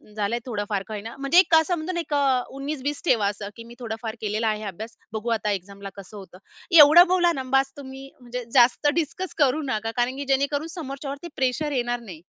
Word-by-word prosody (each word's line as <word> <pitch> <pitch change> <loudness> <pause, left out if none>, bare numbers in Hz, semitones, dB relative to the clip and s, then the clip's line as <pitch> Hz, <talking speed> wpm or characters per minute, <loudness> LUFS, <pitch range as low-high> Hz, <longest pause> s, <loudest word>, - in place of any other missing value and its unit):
झालंय, 215 +3 -1
थोडं 210 -5 -3
फार 200 -2 -1
का 220 - -7
होई 210 - -5
ना, 225 +2 -9
म्हणजे 275 +5 +4
एक 370 - +6
का 320 -1 +7
समजून 345 +1 -3
एक 335 -3 -4
अ, 275 -3 +2 0.2
19-20 285 0 -4
ठेवा 225 -10 +3
असं, 200 0 -4
की 230 - -10
मी 235 +1 -13
थोडाफार 225 -1 -5
केलेला 215 +1 -1
आहे 215 0 -1
अभ्यास. 220 +4 -8 0.2
बघू 220 +2 -3
आता 210 -2 0
एक्झामला 200 +1 -6
कसं 200 +1 -11
होतं? 185 -2 -12 0.4
एवढं 310 +5 +9
बोला 355 -1 +3
ना 265 - -4
बास, 270 0 +1
तुम्ही 270 -1 -9
म्हणजे 245 0 -6
जास्त 250 +3 +4
डिस्कस 340 +3 -3
करू 290 0 +2
नका, 225 -2 -2
कारण 245 +2 0
की 285 - -4
जेणेकरून 280 +3 +1
समोरच्यावरती 280 -1 -6
प्रेशर 265 +3 0
येणार 245 -2 -1
नाही. 180 -9 -11
255 Hz, 210 wpm, -24 LUFS, 220-285 Hz, 0.4 s, एवढं